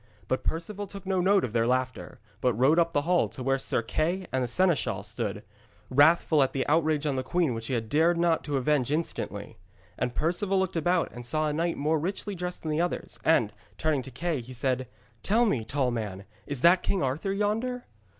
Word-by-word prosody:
But 130 Hz, -, -1 dB
Perceval 200 Hz, +5 st, -3 dB
took 195 Hz, -1 st, -9 dB
no 190 Hz, -1 st, +1 dB
note 195 Hz, +1 st, +4 dB
of 115 Hz, -, -3 dB
their 115 Hz, -1 st, +2 dB
laughter, 130 Hz, 0 st, -2 dB, 0.2 s
but 125 Hz, -3 st, +2 dB
rode 135 Hz, +8 st, +4 dB
up 170 Hz, 0 st, +2 dB
the 145 Hz, -3 st, +1 dB
hall 175 Hz, +2 st, +2 dB
to 130 Hz, -, -6 dB
where 135 Hz, +1 st, +1 dB
Sir 115 Hz, -, +1 dB
Kay 170 Hz, +10 st, -1 dB
the 130 Hz, -1 st, +1 dB
seneschal 175 Hz, +5 st, +1 dB
stood, -, -, -3 dB, 0.5 s
wrathful 150 Hz, +2 st, +5 dB
at 130 Hz, -1 st, +1 dB
the 135 Hz, -, -1 dB
outrage 155 Hz, -1 st, +2 dB
on 140 Hz, -3 st, 0 dB
the -, -, 0 dB
queen 160 Hz, +1 st, 0 dB
which 115 Hz, 0 st, -5 dB
he 130 Hz, -, -1 dB
had 115 Hz, -, -1 dB
not 110 Hz, -, -15 dB
dared 170 Hz, +1 st, +3 dB
to 145 Hz, -2 st, -1 dB
avenge 135 Hz, 0 st, +1 dB
instantly. 105 Hz, -, -3 dB, 0.4 s
And 125 Hz, -1 st, -2 dB
Perceval 185 Hz, +5 st, 0 dB
looked 190 Hz, -1 st, 0 dB
about 175 Hz, +2 st, +1 dB
and 120 Hz, -, -9 dB
saw 155 Hz, +5 st, 0 dB
a -, -, -2 dB
knight 170 Hz, +2 st, -1 dB
more 155 Hz, +2 st, +1 dB
richly 195 Hz, +5 st, -3 dB
dressed 180 Hz, -1 st, -5 dB
than 155 Hz, -, -2 dB
the 155 Hz, +2 st, +1 dB
others, 175 Hz, -, -3 dB
and, -, -, +3 dB, 0.2 s
turning 155 Hz, -3 st, +1 dB
to 135 Hz, -, -9 dB
Kay, 155 Hz, +2 st, -2 dB
he 125 Hz, +2 st, -10 dB
said: 130 Hz, 0 st, -1 dB, 0.3 s
'Tell 230 Hz, +4 st, +3 dB
me, 135 Hz, -, 0 dB
tall 130 Hz, +2 st, 0 dB
man, 105 Hz, -5 st, -4 dB, 0.2 s
is 140 Hz, -3 st, -3 dB
that 175 Hz, +4 st, +6 dB
King 190 Hz, -5 st, 0 dB
Arthur 145 Hz, +9 st, -1 dB
yonder?' 225 Hz, +5 st, -1 dB
155 Hz, 210 wpm, -27 LUFS, 130-175 Hz, 0.5 s, that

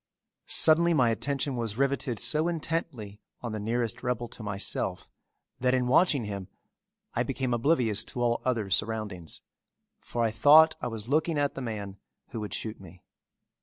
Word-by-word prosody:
Suddenly 170 Hz, +2 st, +7 dB
my 125 Hz, -5 st, +3 dB
attention 140 Hz, +3 st, -2 dB
was 115 Hz, -3 st, -4 dB
riveted 140 Hz, -3 st, -1 dB
so 155 Hz, +9 st, +1 dB
intently 145 Hz, -11 st, -4 dB, 0.2 s
on 120 Hz, -, -5 dB
the 110 Hz, -, -4 dB
nearest 115 Hz, +2 st, -2 dB
rebel 120 Hz, -1 st, -2 dB
to 120 Hz, -, -12 dB
myself 100 Hz, -2 st, -3 dB, 0.5 s
that 125 Hz, 0 st, +1 dB
in 125 Hz, -1 st, 0 dB
watching 140 Hz, -1 st, +3 dB
him 100 Hz, -2 st, -6 dB, 0.7 s
I -, -, -1 dB
became 130 Hz, -2 st, -2 dB
oblivious 120 Hz, -4 st, +1 dB
to 125 Hz, -, -6 dB
all 120 Hz, -1 st, 0 dB
other 115 Hz, -6 st, -2 dB
surroundings, 100 Hz, -5 st, -2 dB, 0.6 s
for 120 Hz, -, -3 dB
I 115 Hz, -, +1 dB
thought 150 Hz, +8 st, +6 dB
I -, -, -2 dB
was 115 Hz, -2 st, -5 dB
looking 155 Hz, +3 st, 0 dB
at 145 Hz, -1 st, 0 dB
the 135 Hz, -, -7 dB
man 105 Hz, -5 st, -6 dB, 0.3 s
who 115 Hz, -, -6 dB
would 105 Hz, -1 st, -4 dB
shoot 110 Hz, -2 st, -6 dB
me. 90 Hz, -1 st, -15 dB
120 Hz, 165 wpm, -27 LUFS, 105-140 Hz, 0.7 s, Suddenly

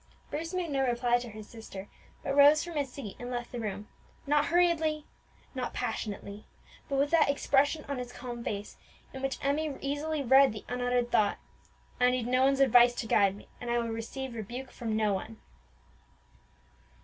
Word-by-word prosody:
Bruce 325 Hz, +3 st, -3 dB
made 365 Hz, -4 st, -2 dB
no 275 Hz, -1 st, +1 dB
reply 245 Hz, -1 st, +2 dB
to 240 Hz, -1 st, -7 dB
his 215 Hz, -1 st, -10 dB
sister, 205 Hz, -4 st, -9 dB, 0.4 s
but 275 Hz, -, -1 dB
rose 290 Hz, +2 st, +7 dB
from 345 Hz, -, -7 dB
his 280 Hz, -3 st, -1 dB
seat 245 Hz, -7 st, -7 dB
and 245 Hz, -, -6 dB
left 240 Hz, -1 st, -4 dB
the 245 Hz, -, -5 dB
room; 210 Hz, -1 st, -4 dB, 0.4 s
not 295 Hz, +1 st, +3 dB
hurriedly, 325 Hz, -3 st, +2 dB, 0.5 s
not -, -, -4 dB
passionately, 205 Hz, 0 st, -4 dB, 0.4 s
but 275 Hz, -, 0 dB
with 280 Hz, +1 st, +2 dB
that 320 Hz, -4 st, +4 dB
expression 285 Hz, +2 st, +2 dB
on 280 Hz, -2 st, -3 dB
his 245 Hz, -1 st, -6 dB
calm 240 Hz, -1 st, -7 dB
face 205 Hz, -2 st, -5 dB, 0.4 s
in 265 Hz, -, -7 dB
which 270 Hz, 0 st, -2 dB
Emmie 290 Hz, +1 st, 0 dB
easily 290 Hz, +2 st, -2 dB
read 265 Hz, -1 st, +6 dB
the 215 Hz, -, -9 dB
unuttered 245 Hz, -1 st, 0 dB
thought, 205 Hz, -1 st, +3 dB, 0.6 s
"I 250 Hz, 0 st, +5 dB
need 250 Hz, -2 st, 0 dB
no 255 Hz, +1 st, +2 dB
one's 275 Hz, 0 st, +3 dB
advice 245 Hz, -2 st, +6 dB
to -, -, -3 dB
guide 200 Hz, -3 st, +3 dB
me, 205 Hz, -, -14 dB
and 245 Hz, -, -5 dB
I 240 Hz, -, +2 dB
will 235 Hz, -1 st, -1 dB
receive 235 Hz, +3 st, -5 dB
rebuke 240 Hz, +4 st, -6 dB
from 225 Hz, -2 st, -3 dB
no 215 Hz, -2 st, +2 dB
one." 220 Hz, +3 st, -5 dB
250 Hz, 185 wpm, -30 LUFS, 230-280 Hz, 0.6 s, rose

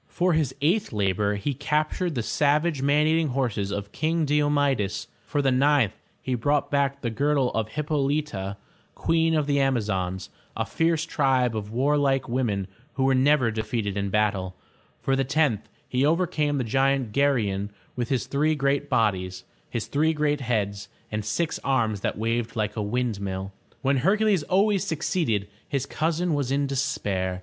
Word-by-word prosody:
For 180 Hz, 0 st, +1 dB
his 155 Hz, -4 st, 0 dB
eighth 195 Hz, +8 st, +2 dB
labor 100 Hz, -1 st, +1 dB
he 100 Hz, +8 st, -2 dB
captured 155 Hz, +5 st, -1 dB
the 120 Hz, -, -1 dB
savage 150 Hz, +3 st, +1 dB
man 145 Hz, +2 st, +3 dB
eat 160 Hz, +1 st, +3 dB
ing 160 Hz, -, +1 dB
horses 125 Hz, -7 st, -1 dB
of 100 Hz, 0 st, -4 dB
King 160 Hz, +2 st, 0 dB
Di 150 Hz, +1 st, +2 dB
o 145 Hz, -, +2 dB
me'des; 140 Hz, -9 st, +1 dB, 0.2 s
for 145 Hz, -1 st, 0 dB
the 135 Hz, -, +3 dB
ninth 135 Hz, -4 st, +3 dB, 0.3 s
he 130 Hz, -, -2 dB
brought 145 Hz, +4 st, +1 dB
back 140 Hz, -1 st, +1 dB
the 120 Hz, -, -2 dB
girdle 140 Hz, +1 st, +1 dB
of 110 Hz, -1 st, -1 dB
Hip 150 Hz, +6 st, -5 dB
pol'y 145 Hz, 0 st, +1 dB
ta, 95 Hz, -7 st, -5 dB, 0.4 s
Queen 165 Hz, 0 st, +2 dB
of 155 Hz, -2 st, +2 dB
the 140 Hz, -1 st, +1 dB
Am'a 135 Hz, -2 st, +2 dB
zons, 95 Hz, -3 st, -3 dB, 0.3 s
a -, -, 0 dB
fierce 165 Hz, -1 st, +1 dB
tribe 130 Hz, -6 st, +1 dB
of 105 Hz, -1 st, -4 dB
war 135 Hz, +6 st, +1 dB
like 135 Hz, -2 st, +1 dB
women 115 Hz, -6 st, -1 dB, 0.3 s
who 135 Hz, -, -1 dB
were 135 Hz, 0 st, +4 dB
never 130 Hz, -2 st, +3 dB
defeated 110 Hz, -2 st, -2 dB
in 100 Hz, -1 st, -1 dB
battle; 95 Hz, -3 st, 0 dB, 0.4 s
for 135 Hz, -, +1 dB
the 135 Hz, -, +1 dB
tenth 135 Hz, -5 st, +1 dB, 0.2 s
he 125 Hz, +1 st, 0 dB
overcame 155 Hz, -2 st, +1 dB
the 130 Hz, -, 0 dB
giant 135 Hz, 0 st, +1 dB
Ger'y 130 Hz, -6 st, +2 dB
on 100 Hz, +1 st, -3 dB, 0.3 s
with 120 Hz, -2 st, -2 dB
his 130 Hz, -4 st, 0 dB
three 155 Hz, +3 st, +1 dB
great 140 Hz, 0 st, 0 dB
bodies, 95 Hz, -7 st, 0 dB, 0.3 s
his 115 Hz, -, -3 dB
three 155 Hz, +3 st, +1 dB
great 150 Hz, -1 st, 0 dB
heads, 105 Hz, -5 st, -2 dB, 0.2 s
and 105 Hz, 0 st, -2 dB
six 160 Hz, +10 st, -1 dB
arms 115 Hz, -6 st, +1 dB
that -, -, -2 dB
waved 115 Hz, +1 st, -1 dB
like 105 Hz, -1 st, -1 dB
a 110 Hz, -, -2 dB
windmill. 100 Hz, -4 st, -2 dB, 0.3 s
When 135 Hz, +1 st, +2 dB
Hercules 200 Hz, -, +3 dB
always 195 Hz, +5 st, +2 dB
succeeded, 150 Hz, -, -1 dB, 0.2 s
his 140 Hz, -2 st, -1 dB
cousin 165 Hz, +3 st, -1 dB
was 140 Hz, -3 st, -1 dB
in 140 Hz, +1 st, +1 dB
despair. 105 Hz, -10 st, -1 dB
135 Hz, 180 wpm, -25 LUFS, 105-150 Hz, 0.4 s, were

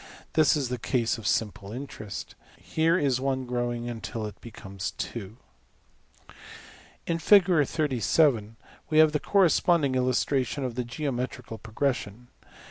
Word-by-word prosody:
This 155 Hz, 0 st, +4 dB
is 135 Hz, -4 st, -2 dB
the 125 Hz, -1 st, -3 dB
case 115 Hz, -1 st, 0 dB
of 105 Hz, -, -5 dB
simple 105 Hz, -2 st, -1 dB
interest. 110 Hz, -5 st, -7 dB, 0.2 s
Here 165 Hz, +2 st, +1 dB
is 135 Hz, -6 st, +1 dB
$1$~growing 120 Hz, -3 st, -2 dB
till 115 Hz, -3 st, -4 dB
it 105 Hz, -1 st, -9 dB
becomes~$2$. 100 Hz, 0 st, -6 dB, 1.7 s
In 165 Hz, 0 st, -1 dB
\Fig, 150 Hz, -, +3 dB, 0.4 s
we 155 Hz, -, +1 dB
have 155 Hz, -1 st, +7 dB
the 150 Hz, -, 0 dB
corresponding 170 Hz, -6 st, +3 dB
illustration 130 Hz, +1 st, 0 dB
of 125 Hz, -2 st, -3 dB
the 125 Hz, +1 st, -2 dB
geometrical 125 Hz, -3 st, -4 dB
progression. 120 Hz, -1 st, -3 dB
125 Hz, 115 wpm, -27 LUFS, 115-150 Hz, 1.7 s, have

